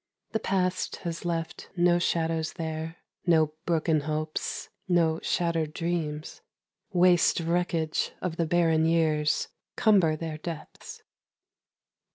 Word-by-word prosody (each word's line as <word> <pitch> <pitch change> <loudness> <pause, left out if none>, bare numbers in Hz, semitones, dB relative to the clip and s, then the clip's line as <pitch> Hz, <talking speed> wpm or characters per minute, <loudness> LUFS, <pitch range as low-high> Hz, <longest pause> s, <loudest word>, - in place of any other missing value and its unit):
The 220 - 0
past 185 -3 0
has 170 0 -4
left 165 -1 -3
no 175 0 +4
shadows 165 -2 0
there, 160 0 -4 0.3
No 160 -3 +4
broken 160 -2 +2
hopes 155 +1 -3 0.2
No 165 -3 +3
shattered 165 -3 0
dreams 165 -3 -3 0.5
Waste 180 -2 +4
wreckage 165 -2 0
of 180 -3 -3
the 165 - +1
barren 160 -1 +3
years, 155 -2 +2 0.3
Cumber 190 -8 +4
their 155 -1 -5
depths. 165 0 -8
165 Hz, 110 wpm, -28 LUFS, 155-175 Hz, 0.5 s, no